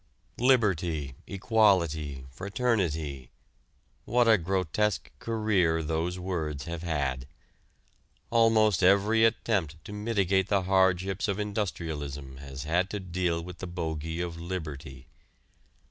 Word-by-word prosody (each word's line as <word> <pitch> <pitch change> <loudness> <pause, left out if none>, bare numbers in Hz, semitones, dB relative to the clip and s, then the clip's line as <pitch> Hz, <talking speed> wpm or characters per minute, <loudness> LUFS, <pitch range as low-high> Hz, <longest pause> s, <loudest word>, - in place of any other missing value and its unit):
Liberty, 90 - +2
equality, 85 - +1
fraternity 80 - -1 0.8
what 120 -1 +3
a 110 - +7
grotesque 95 +3 -1
career 100 -8 +1
those 80 +3 -1
words 80 -6 -3
have 85 0 -5
had. 70 -6 -2 1.0
Almost 110 -5 +4
every 100 +4 +4
attempt 100 -8 0
to 105 - -8
mitigate 100 -3 +1
the 100 -2 +2
hardships 95 0 +2
of 100 -2 -1
industrialism 80 -10 -4
has 70 -1 -7
had 90 +4 +1
to 105 - -3
deal 90 -2 -1
with 90 +1 -9
the 95 - -5
bogey 80 -1 -3
of 85 -2 -4
liberty. 75 -6 -6
90 Hz, 110 wpm, -28 LUFS, 80-100 Hz, 1.0 s, a